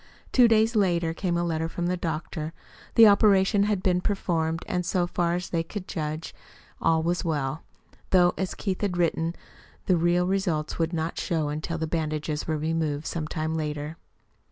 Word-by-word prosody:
Two 250 Hz, -2 st, +6 dB
days 225 Hz, +1 st, +3 dB
later 175 Hz, -5 st, +2 dB
came 175 Hz, 0 st, -1 dB
a 170 Hz, -, 0 dB
letter 165 Hz, -1 st, -1 dB
from 175 Hz, +1 st, -3 dB
the 180 Hz, +1 st, +1 dB
doctor. 160 Hz, -2 st, -4 dB, 0.4 s
The 230 Hz, -, +9 dB
operation 200 Hz, -1 st, +4 dB
had 205 Hz, -3 st, 0 dB
been 180 Hz, -1 st, +2 dB
performed 165 Hz, -5 st, -1 dB
and, 180 Hz, -1 st, -1 dB
so 175 Hz, 0 st, +1 dB
far 175 Hz, -1 st, 0 dB
as 180 Hz, 0 st, -4 dB
they 165 Hz, -, +1 dB
could 185 Hz, +3 st, -7 dB
judge, 155 Hz, 0 st, -4 dB, 0.5 s
all 160 Hz, -1 st, +3 dB
was 175 Hz, +2 st, 0 dB
well, 150 Hz, -3 st, -2 dB, 0.5 s
though, 180 Hz, -2 st, +5 dB
as 190 Hz, -1 st, -3 dB
Keith 190 Hz, -3 st, -3 dB
had 195 Hz, -4 st, -1 dB
written, 165 Hz, 0 st, 0 dB, 0.5 s
the 185 Hz, -, +3 dB
real 175 Hz, +1 st, +2 dB
results 180 Hz, -6 st, -1 dB
would 165 Hz, 0 st, +1 dB
not 165 Hz, -1 st, -2 dB
show 160 Hz, -3 st, -1 dB
until 155 Hz, +2 st, -3 dB
the 160 Hz, -, -1 dB
bandages 155 Hz, -2 st, -2 dB
were 155 Hz, -1 st, 0 dB
removed 155 Hz, -1 st, -1 dB
some 160 Hz, -2 st, -3 dB
time 155 Hz, 0 st, -2 dB
later. 150 Hz, -1 st, -3 dB
170 Hz, 180 wpm, -26 LUFS, 160-180 Hz, 0.5 s, The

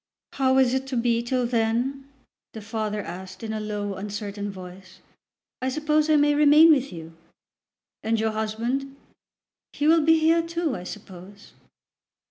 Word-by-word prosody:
"How 265 Hz, -1 st, +2 dB
is 260 Hz, -2 st, +4 dB
it 265 Hz, 0 st, -2 dB
to 260 Hz, -2 st, -3 dB
be 235 Hz, 0 st, +1 dB
till 250 Hz, +1 st, -1 dB
then?" 240 Hz, +4 st, -1 dB, 0.4 s
the 220 Hz, -, -8 dB
father 215 Hz, -1 st, -3 dB
asked 190 Hz, +3 st, -9 dB
in 220 Hz, -1 st, -4 dB
a 215 Hz, -, -3 dB
low, 210 Hz, -1 st, -4 dB
uncertain 205 Hz, +1 st, -5 dB
voice. 185 Hz, -1 st, -11 dB, 0.6 s
"I 260 Hz, -, 0 dB
suppose 305 Hz, +2 st, +1 dB
I 310 Hz, -, +5 dB
may 295 Hz, 0 st, +4 dB
remain 300 Hz, +2 st, +7 dB
with 275 Hz, -2 st, +2 dB
you." 165 Hz, -1 st, -10 dB, 0.9 s
"And 225 Hz, 0 st, 0 dB
your 220 Hz, 0 st, 0 dB
husband?" 230 Hz, +6 st, -3 dB, 0.8 s
"He 290 Hz, -, -2 dB
will 325 Hz, +1 st, +5 dB
be 325 Hz, +2 st, +4 dB
here 325 Hz, +1 st, +3 dB
too, 335 Hz, -4 st, -2 dB
I 180 Hz, -, -7 dB
suppose." 200 Hz, 0 st, -11 dB
235 Hz, 155 wpm, -24 LUFS, 205-280 Hz, 0.9 s, remain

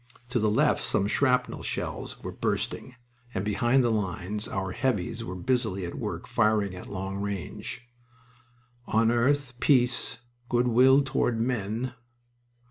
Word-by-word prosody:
To 125 Hz, -, +1 dB
the 110 Hz, -1 st, +2 dB
left 105 Hz, -, +2 dB
some 100 Hz, -, +1 dB
shrapnel 125 Hz, +3 st, +1 dB
shells -, -, -5 dB
were -, -, -4 dB
bursting, 125 Hz, -, -2 dB, 0.4 s
and 95 Hz, +1 st, -1 dB
behind 120 Hz, +5 st, +3 dB
the 120 Hz, -, +2 dB
lines 105 Hz, 0 st, -2 dB
our 95 Hz, -1 st, -3 dB
"heavies" 115 Hz, -1 st, -1 dB
were 90 Hz, -, -5 dB
busily 110 Hz, -3 st, 0 dB
at 85 Hz, -, -5 dB
work -, -, -4 dB
firing 105 Hz, -3 st, +2 dB
at 90 Hz, -, -9 dB
long 95 Hz, 0 st, -4 dB
range. 100 Hz, +4 st, -5 dB, 1.0 s
"On 115 Hz, +1 st, +3 dB
earth 130 Hz, +2 st, +2 dB
peace, 125 Hz, -4 st, +2 dB, 0.3 s
good 120 Hz, +1 st, +2 dB
will 130 Hz, +4 st, +6 dB
toward 125 Hz, -3 st, 0 dB
men." 115 Hz, +1 st, -1 dB
115 Hz, 135 wpm, -27 LUFS, 100-125 Hz, 1.0 s, will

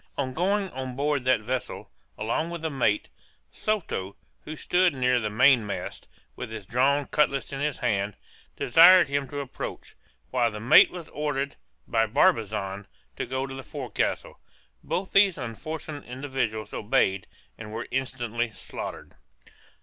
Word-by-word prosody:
On 130 Hz, -2 st, -1 dB
going 195 Hz, +3 st, 0 dB
on 130 Hz, -1 st, -5 dB
board 140 Hz, -1 st, 0 dB
that 130 Hz, -4 st, +3 dB
vessel, 125 Hz, +4 st, -4 dB, 0.3 s
along 115 Hz, +10 st, -1 dB
with 170 Hz, -1 st, -6 dB
the 160 Hz, -, -1 dB
mate, 120 Hz, -6 st, +1 dB, 0.4 s
Soto, 165 Hz, -, -2 dB, 0.3 s
who 155 Hz, -, -6 dB
stood 180 Hz, 0 st, +2 dB
near 125 Hz, -1 st, +2 dB
the 110 Hz, -2 st, -2 dB
mainmast, 115 Hz, -2 st, +2 dB, 0.3 s
with -, -, -6 dB
his 110 Hz, -3 st, -7 dB
drawn 135 Hz, +6 st, +2 dB
cutlass 140 Hz, -1 st, 0 dB
in 135 Hz, -, -4 dB
his 150 Hz, 0 st, -1 dB
hand, 105 Hz, -4 st, -1 dB, 0.4 s
desired 170 Hz, +5 st, +7 dB
him 140 Hz, -1 st, -1 dB
to 145 Hz, +2 st, -4 dB
approach, 135 Hz, -, -7 dB, 0.4 s
while 120 Hz, -2 st, +2 dB
the 105 Hz, -1 st, -7 dB
mate 115 Hz, +3 st, +7 dB
was 175 Hz, -3 st, -8 dB
ordered, 145 Hz, -2 st, -2 dB, 0.3 s
by 115 Hz, -1 st, +2 dB
Barbazan, 105 Hz, -, +1 dB, 0.3 s
to -, -, -4 dB
go 130 Hz, +2 st, -2 dB
to 135 Hz, -, -7 dB
the 135 Hz, -, -6 dB
forecastle. -, -, -3 dB, 0.4 s
Both 185 Hz, +1 st, -3 dB
these 195 Hz, -2 st, +5 dB
unfortunate 145 Hz, +5 st, -6 dB
individuals 125 Hz, -5 st, -3 dB
obeyed, 95 Hz, -3 st, +1 dB, 0.3 s
and 105 Hz, -1 st, -9 dB
were 115 Hz, +2 st, -5 dB
instantly 120 Hz, -3 st, -2 dB
slaughtered. 110 Hz, -, -8 dB
130 Hz, 145 wpm, -26 LUFS, 110-150 Hz, 0.4 s, desired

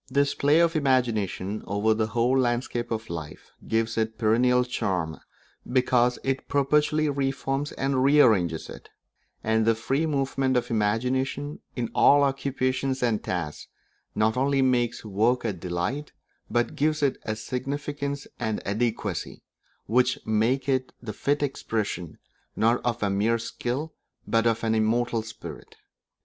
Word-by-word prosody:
This 140 Hz, +1 st, +2 dB
play 145 Hz, +3 st, +3 dB
of 170 Hz, -1 st, +3 dB
the 155 Hz, -, +1 dB
imagination 110 Hz, -7 st, 0 dB
over 105 Hz, +2 st, +2 dB
the 110 Hz, 0 st, 0 dB
whole 120 Hz, +3 st, +1 dB
landscape 120 Hz, -1 st, 0 dB
of 110 Hz, -2 st, -4 dB
life 80 Hz, -3 st, -7 dB, 0.2 s
gives 115 Hz, 0 st, 0 dB
it 110 Hz, 0 st, -1 dB
perennial 125 Hz, +3 st, +3 dB
charm, 90 Hz, -9 st, -2 dB, 0.5 s
because 125 Hz, -1 st, +3 dB
it 135 Hz, 0 st, -2 dB
perpetually 150 Hz, +2 st, +2 dB
re 140 Hz, -2 st, 0 dB
forms 135 Hz, +1 st, -2 dB
and 135 Hz, -1 st, 0 dB
re 145 Hz, +2 st, +5 dB
arranges 90 Hz, -, +3 dB
it; -, -, -11 dB, 0.5 s
and 110 Hz, 0 st, +2 dB
the 115 Hz, 0 st, +3 dB
free 135 Hz, +8 st, 0 dB
movement 135 Hz, -3 st, 0 dB
of 125 Hz, -, -1 dB
the -, -, -2 dB
imagination 130 Hz, +7 st, 0 dB, 0.2 s
in 120 Hz, -3 st, -3 dB
all 145 Hz, 0 st, +6 dB
occupations 135 Hz, -1 st, -1 dB
and 115 Hz, -3 st, +1 dB
tasks 85 Hz, -5 st, -4 dB, 0.5 s
not 110 Hz, +1 st, +2 dB
only 135 Hz, +1 st, +2 dB
makes 120 Hz, -3 st, +1 dB
work 110 Hz, +5 st, +1 dB
a 110 Hz, -, 0 dB
delight, 90 Hz, -, -3 dB, 0.4 s
but 120 Hz, 0 st, 0 dB
gives 155 Hz, +1 st, +1 dB
it 140 Hz, -, +1 dB
a 110 Hz, -, -3 dB
significance 140 Hz, +4 st, -4 dB
and 110 Hz, -3 st, -1 dB
adequacy, 110 Hz, +3 st, -2 dB, 0.4 s
which 125 Hz, +3 st, +2 dB
make 115 Hz, +6 st, +1 dB
it 130 Hz, -2 st, 0 dB
the 110 Hz, -3 st, -6 dB
fit 145 Hz, +7 st, 0 dB
expression, 105 Hz, -, -3 dB, 0.4 s
not 115 Hz, +2 st, +2 dB
of 120 Hz, -2 st, -1 dB
a 100 Hz, -, +1 dB
mere 110 Hz, +4 st, +2 dB
skill, 125 Hz, +6 st, -4 dB, 0.3 s
but 115 Hz, 0 st, +2 dB
of 115 Hz, 0 st, 0 dB
an 110 Hz, -1 st, +1 dB
immortal 115 Hz, +1 st, +1 dB
spirit. 110 Hz, +1 st, -10 dB
120 Hz, 150 wpm, -26 LUFS, 110-135 Hz, 0.5 s, all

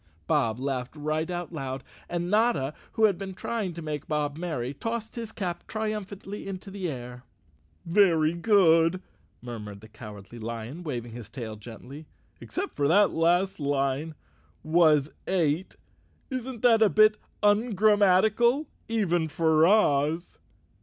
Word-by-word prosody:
Bob 115 Hz, +6 st, +1 dB
laughed 130 Hz, 0 st, -3 dB
right 155 Hz, +2 st, -2 dB
out 175 Hz, -1 st, -4 dB
loud, 135 Hz, -3 st, -4 dB, 0.3 s
and 175 Hz, 0 st, -2 dB
Notta, 195 Hz, -, +2 dB, 0.2 s
who 220 Hz, -, 0 dB
had 200 Hz, -4 st, +4 dB
been 190 Hz, -1 st, -6 dB
trying 215 Hz, -2 st, -3 dB
to 170 Hz, 0 st, -7 dB
make 150 Hz, -2 st, -4 dB
Bob 150 Hz, -2 st, -1 dB
merry, 155 Hz, -7 st, -3 dB
tossed 225 Hz, -, -4 dB
his 230 Hz, -2 st, -6 dB
cap 180 Hz, -4 st, -4 dB
triumphantly 210 Hz, -2 st, -5 dB
into 195 Hz, +1 st, -7 dB
the 190 Hz, -3 st, -3 dB
air. 125 Hz, -3 st, -7 dB, 0.6 s
"Very 165 Hz, -4 st, +4 dB
good," 170 Hz, -2 st, +4 dB, 0.4 s
murmured 105 Hz, -4 st, -7 dB
the 110 Hz, -, -13 dB
Cowardly 105 Hz, 0 st, -11 dB
Lion, 115 Hz, +7 st, -6 dB
waving 120 Hz, -8 st, -5 dB
his 115 Hz, -2 st, -9 dB
tail 115 Hz, -5 st, -6 dB
gently, 125 Hz, +8 st, -11 dB, 0.2 s
" -, -, -37 dB
except 385 Hz, +3 st, -5 dB
that 165 Hz, +9 st, +4 dB
last 175 Hz, +4 st, +2 dB
line. 140 Hz, +2 st, -1 dB, 0.3 s
' -, -, -36 dB, 0.2 s
Was 150 Hz, -3 st, +4 dB, 0.2 s
ate.' 170 Hz, -1 st, 0 dB, 0.6 s
Isn't 255 Hz, -2 st, -5 dB
that 230 Hz, -2 st, +5 dB
a 215 Hz, -, +6 dB
bit 215 Hz, +5 st, +5 dB, 0.3 s
ungrammatical, 215 Hz, +4 st, +4 dB, 0.2 s
even 175 Hz, -7 st, +1 dB
for 160 Hz, 0 st, +3 dB
Oz?" 165 Hz, -5 st, +2 dB
165 Hz, 140 wpm, -27 LUFS, 140-205 Hz, 0.6 s, a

